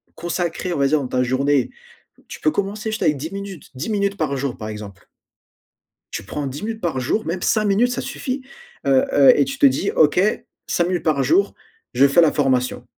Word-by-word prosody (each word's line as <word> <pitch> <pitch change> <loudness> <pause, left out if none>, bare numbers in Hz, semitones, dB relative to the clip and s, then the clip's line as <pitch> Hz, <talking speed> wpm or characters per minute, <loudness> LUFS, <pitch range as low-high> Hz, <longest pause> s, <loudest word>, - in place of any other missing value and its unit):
consacrer, 175 +1 -3
on 145 - -3
va 140 - +3
dire 155 +2 +2
dans 135 - -4
ta 125 0 0
journée 130 +2 +1 0.6
tu - - -8
peux - - +2
commencer 210 -1 -3
juste 215 - -3
avec 150 - +2
10 155 +4 -6
minutes, 195 -4 -8
10 135 +11 -4
minutes 200 -2 0
par 145 -4 -1
jour, 135 -2 -3
par 110 -1 -6
exemple. 105 -2 -9 1.1
Tu - - -4
prends 140 +8 -4
10 135 +6 -7
minutes 220 +1 -4
par 165 -7 -1
jour, 145 - -1
même 175 +2 -3
5 215 +2 +1
minutes 210 +5 +2
ça - - -2
suffit, 270 0 -4 0.4
heu, 135 -1 +4
heu 140 -1 +7
et - - +4
tu 275 - -5
te 285 - +4
dis: 260 -7 +2
«OK, 155 +2 +4 0.5
5 175 - +1
minutes 180 -1 -1
par 150 -4 +1
jour, 385 +4 +2 0.4
je 140 - +5
fais 140 +5 +4
la 160 -3 +4
formation». 130 -3 0
160 Hz, 215 wpm, -21 LUFS, 135-200 Hz, 1.1 s, heu